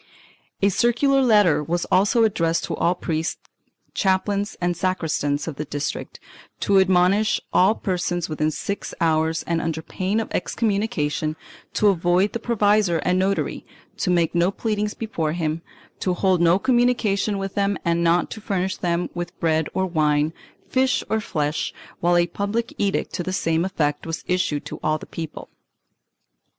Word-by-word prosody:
A 200 - +6
circular 240 +7 +3
letter 210 - +4
was 170 +3 -1
also 205 +5 +4
addressed 170 -6 +1
to - - -3
all 175 +2 +1
priests, 160 -2 -2 0.6
chaplains 200 +1 0
and 175 0 0
sacristans 155 -6 -1
of 150 -4 -5
the 150 - -2
district, 145 0 -4 0.4
to 195 -1 +4
admonish 190 +3 +3
all 190 +4 +5
persons, 175 -4 -2
within 155 0 0
six 200 +6 -4
hours 160 0 +1
and 170 -1 -1
under 160 -1 -3
pain 190 +6 -1
of 225 - -4
excommunication, 165 -9 -1 0.4
to 210 - +4
avoid 180 +2 +2
the 235 - -2
provisor 210 -6 +2
and 180 +1 +2
notary, 195 +1 -1 0.3
to - - -1
make 170 -2 +2
no 175 +1 +3
pleadings 210 0 -2
before 165 -9 -2
them, 160 -1 -2 0.4
to 180 -1 0
hold 185 -2 +2
no 170 +1 +5
communication 230 -4 +1
with 195 0 -4
them 200 -1 +1
and 170 0 +1
not 170 +1 +2
to 220 - -7
furnish 190 -2 -1
them 175 0 -1
with 175 +1 -6
bread 160 -2 +1
or 190 - +1
wine, 155 -3 +1 0.3
fish 260 0 +1
or 220 - +2
flesh, 150 -5 -2 0.2
while 175 0 +3
a 175 - +4
public 205 +7 -3
edict 200 -1 0
to - - -2
the 185 - -3
same 165 -3 +1
effect 155 -6 -1
was 165 0 -4
issued 180 -5 0
to - - -7
all 155 0 +1
the - - -10
people. 160 -2 -7
180 Hz, 160 wpm, -23 LUFS, 165-200 Hz, 0.6 s, A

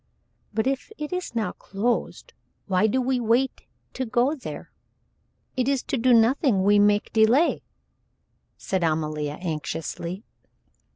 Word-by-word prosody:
"But 220 +1 -1
if 270 +8 -2
it 300 +3 -5
is 360 -9 -4
now 225 -2 0
closed, 225 +5 -3 0.3
why 195 +2 +2
do 255 +5 +1
we 255 0 0
wait 240 +3 0 0.3
to 260 - -3
go 245 +4 +1
there? 285 - -8 0.8
It 255 0 +1
is 275 -3 0
to - - -2
do 255 +2 +3
nothing 230 - +4
we 205 +1 +5
make 205 0 +2
delay," 230 +9 +4 1.0
said 190 -2 -2
Amalia, 155 -2 -1
anxiously. 170 +3 -4
225 Hz, 130 wpm, -25 LUFS, 190-260 Hz, 1.0 s, we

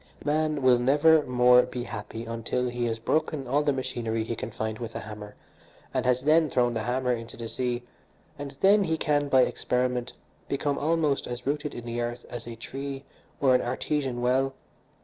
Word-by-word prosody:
Man 150 -1 +1
will 125 -1 +6
never 150 +5 +5
more 125 0 +6
be 125 0 -5
happy 110 +1 -6
until 115 +2 -2
he 120 0 -2
has 115 -1 -1
broken 155 +4 -1
all 140 +4 +2
the 150 -1 +2
machinery 120 -4 -2
he 115 +1 -3
can 110 - -5
find 110 0 -4
with 115 -2 -6
a - - -3
hammer, 105 -1 -9 0.6
and - - 0
has 125 0 +2
then 155 +1 +4
thrown 120 -2 +2
the 115 - -2
hammer 125 +2 0
into 115 -1 -6
the 115 - -5
sea; 120 0 -2 0.6
and 140 -1 -7
then 200 +1 +5
he 160 -1 0
can, 145 -2 +1
by 130 -1 +6
experiment, 125 -1 -1 0.4
become 140 0 -1
almost 155 -2 +1
as 120 0 -6
rooted 145 +1 -2
in 120 - -7
the 120 0 -3
earth 120 0 -4
as 120 -1 -6
a 120 - -6
tree 135 +4 -6 0.4
or 135 -2 +4
an 125 - +4
artesian 130 0 -2
well. 135 +2 +2
125 Hz, 190 wpm, -27 LUFS, 120-145 Hz, 0.6 s, will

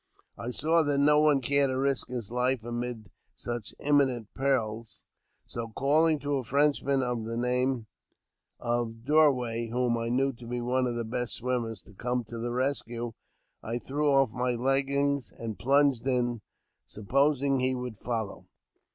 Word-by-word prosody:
I 115 - -5
saw 160 +6 +3
that 145 -2 +1
no 150 +1 +5
one 150 -3 +4
cared 140 +2 +3
to 130 - -1
risk 135 0 +1
his 120 -4 -4
life 125 -1 +1
amid 120 -4 -5 0.2
such 120 -3 -4
imminent 135 -6 +1
perils, 115 -5 -1 0.4
so, 115 -1 -5
calling 155 +3 +3
to 145 0 0
a 130 - -3
Frenchman 140 0 +2
of 120 -2 -2
the 115 +1 -4
name 125 0 0 0.7
of 120 -1 -2
Dorway, 125 -6 +3
whom 120 0 0
I 115 0 -2
knew 135 +3 +1
to 120 0 -12
be 120 +1 -3
one 125 +1 +1
of 120 - -2
the 120 -1 -2
best 120 +1 -2
swimmers, 120 -4 -2
to - - -17
come 125 +4 -2
to 115 - -6
the 120 +1 -2
rescue, 120 -2 -2 0.5
I 115 +2 -3
threw 145 +4 -1
off 135 -4 +4
my 125 0 -1
leggings 140 +1 +1
and 115 -2 -6
plunged 135 -1 +3
in, 120 -3 0 0.5
supposing 140 +5 +1
he 130 0 +1
would 125 -4 -6
follow. 115 -4 -4
125 Hz, 160 wpm, -28 LUFS, 120-140 Hz, 0.7 s, no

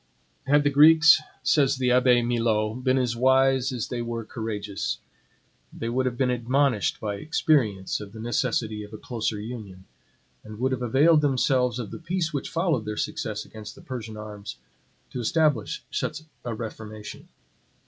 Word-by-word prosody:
Had 145 +1 +4
the 145 - +2
Greeks, 155 +2 +7 0.2
says 140 -4 +3
the 125 -1 +1
Abbe 125 -1 +4
Milot, 115 0 0
been 130 0 +3
as 125 -2 0
wise 130 +1 +3
as 125 -4 -3
they 120 -1 -3
were 115 -1 -4
courageous, 105 -3 -4 0.7
they 115 - -5
would 130 +2 0
have 120 -1 -3
been 125 -1 +2
admonished 125 -1 +1
by 105 -2 -3
experience 115 -8 +1
of 100 -1 -9
the 110 - -11
necessity 115 -2 -1
of 105 +1 -12
a - - -7
closer 110 -2 -3
union, 105 -5 -8 0.6
and 110 0 -10
would 130 +3 0
have 130 -1 -2
availed 145 +7 +4
themselves 130 -3 +2
of 115 -5 -5
the - - -7
peace 170 -1 -2
which 140 - -3
followed 165 - 0
their 105 0 -4
success 105 -1 -3
against 110 -1 -10
the - - -14
Persian 115 -4 -7
arms, 105 -1 -8 0.5
to 125 - -5
establish 150 -2 +1
such 155 0 -3 0.2
a 120 -2 -4
reformation. 110 -1 -8
120 Hz, 165 wpm, -25 LUFS, 110-135 Hz, 0.7 s, Greeks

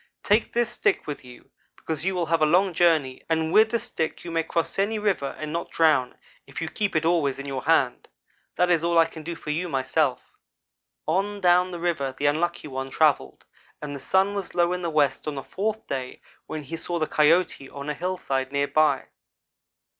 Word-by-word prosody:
Take 210 +2 +2
this 240 0 +1
stick 405 - 0
with 145 -2 -6
you, 125 -1 -15 0.2
because 160 -1 -4
you 190 +1 0
will 175 -2 0
have 165 0 +1
a - - +6
long 185 +3 +3
journey, 155 -7 +2
and 160 0 0
with 220 +1 +6
the 235 - +1
stick 160 -8 -4
you 170 - -5
may 165 0 +1
cross 165 +3 -2
any 210 +3 +1
river 195 -10 -1
and 155 0 -5
not 170 0 -3
drown, 150 -6 +2 0.3
if - - -7
you - - -3
keep 205 -4 -2
it 160 0 +1
always 160 -5 +2
in 140 - -7
your 135 -2 -3
hand. 135 -6 +2 0.5
That 180 0 +2
is 165 -2 +3
all 170 0 +2
I 165 - +7
can 160 0 -9
do 170 +2 -5
for 150 - -5
you, 175 +4 -2
myself.' 130 -3 0 0.7
"On 195 +5 0
down 180 0 +4
the 175 - -6
river 155 -6 -1
the 145 - -2
Unlucky 155 +2 0
one 135 -1 -5
travelled 140 - +1 0.3
and 145 -1 -6
the - - -6
sun 190 +8 +2
was 200 -2 -5
low 175 0 +3
in 180 - -3
the 170 - -1
west 150 -2 +1
on 150 - -2
the 135 - -5
fourth 220 +3 -3
day, 130 -2 -5 0.3
when 155 -1 -5
he 165 +4 -6
saw 175 +1 -3
the 155 - +1
Coyote 155 -2 +2
on 140 0 -8
a 150 - -1
hillside 145 -6 -2
near 140 0 +1
by. 150 -3 +2
165 Hz, 215 wpm, -25 LUFS, 145-180 Hz, 0.7 s, I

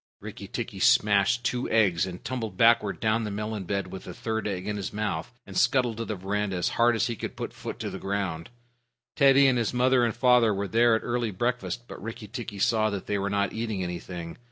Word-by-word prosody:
Rikki - - -8
tikki - - -5
smashed 105 +4 +4
two 125 0 -1
eggs, 95 -6 +3
and 90 +2 -8
tumbled 120 -3 -4
backward 115 -4 +4
down 110 +1 +1
the 105 - -3
melon 105 -1 -4
bed 100 +2 -1
with 95 - -8
the 90 - -8
third 110 -2 -2
egg 95 -1 -4
in 105 - -1
his 100 -2 -4
mouth, 105 -6 -3
and - - -11
scuttled 125 -4 +2
to 115 - -3
the 110 - -3
veranda 100 +1 -2
as 90 - 0
hard 120 0 +3
as 110 0 +1
he 120 -2 -2
could - - -6
put - - -5
foot - - -7
to - - -3
the - - -6
ground. 95 -4 -3 0.7
Teddy 140 -1 +6
and 130 -2 +4
his 115 +1 -1
mother 125 0 +4
and 115 -2 0
father 120 -3 +4
were 100 +1 -2
there 115 +3 +4
at 110 - -2
early 120 -1 -1
breakfast, 120 +3 -2
but - - -9
Rikki 115 0 -7
tikki 115 -2 -6
saw 110 0 +2
that 100 -3 -4
they 100 -1 -1
were 100 +1 -1
not 100 -1 0
eating 110 -4 -2
anything. 85 0 -6
110 Hz, 225 wpm, -27 LUFS, 100-120 Hz, 0.7 s, Teddy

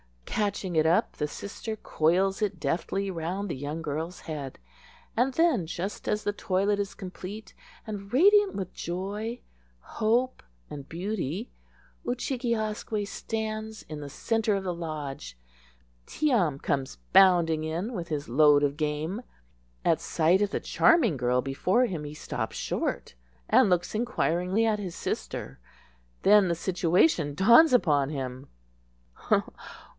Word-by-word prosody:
Catching 200 -4 -2
it 160 0 +4
up, 170 - +2
the 150 - -1
sister 210 +7 -6
coils 190 +2 +1
it 210 -2 -1
deftly 195 +3 -1
round 180 +4 -3
the - - -2
young 145 +4 -5
girl's 160 +4 -4
head; 145 -5 -6 0.6
and 255 +3 +1
then, 315 - +3
just 180 +4 -5
as 210 0 0
the 205 - 0
toilet 200 +1 0
is 200 0 -3
complete, 195 +2 -8 0.3
and 200 -2 -7
radiant 400 - +5
with 190 -3 -4
joy, 205 +7 -4 0.4
hope, 235 +4 0 0.3
and 140 -1 -8
beauty 185 - -3 0.6
Oo 245 - +1
chig 255 0 -4
e 235 -1 +2
asque 215 -1 -2
stands 220 0 -4
in 155 -1 -8
the 145 -1 -7
centre 220 +7 0
of 195 - -2
the 180 -2 -2
lodge. 150 - -6 0.7
Tee 305 -1 0
am 175 - +2
comes 135 -1 -2 0.2
bounding 170 -5 +5
in 170 +9 -3
with 175 -6 -4
his 150 -3 -3
load 145 +3 +5
of 145 0 0
game. 155 +7 -2 0.6
At - - +3
sight 170 +4 +2
of 205 - +2
the - - -2
charming 235 - +3
girl 125 0 +1
before 180 - +2
him 170 -10 -4
he 145 +1 -7
stops - - -4
short, - - -3 0.3
and 235 -1 +5
looks 175 -1 +1
inquiringly 210 -3 0
at 215 -2 +1
his 185 -4 -5
sister. - - -4 0.6
Then 205 -1 +6
the 170 - +1
situation 170 - +2
dawns 235 - +7
upon 150 - +3
him. 130 -2 -5
185 Hz, 145 wpm, -27 LUFS, 155-215 Hz, 0.7 s, dawns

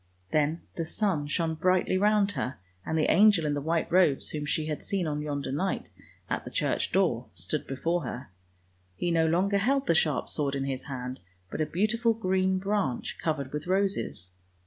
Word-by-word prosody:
" 90 0 -37
Then 155 +2 +1 0.2
the 165 - 0
sun 165 -3 0
shone 160 +1 0
brightly 185 +3 +2
round 205 +1 +3
her, 130 -9 -3 0.3
and 160 - -1
the 155 - +3
angel 200 -5 +5
in 145 - +1
the 145 - -1
white 165 +2 0
robes 170 -6 +3
whom 150 -1 -3
she 155 +1 0
had 155 -1 -4
seen 195 -3 -1
on 150 -1 -2
yonder 145 -2 -3
night, 185 +8 -2 0.4
at - - -2
the - - -7
church - - 0
door, - - +1
stood - - -4
before 165 +6 -1
her. 125 -2 -6 0.6
He 175 - -1
no 165 -1 +3
longer 190 +5 +2
held 270 +6 +2
the - - +3
sharp 150 -5 +1
sword 140 -2 -1
in 135 - -1
his 135 -1 -3
hand, 130 -2 -5 0.3
but - - -2
a 155 - +1
beautiful 225 +5 +1
green 190 -3 +1
branch, 195 -9 -1
covered 145 -4 -2
with 150 +3 -4
roses. 190 - -1
165 Hz, 190 wpm, -28 LUFS, 145-190 Hz, 0.6 s, angel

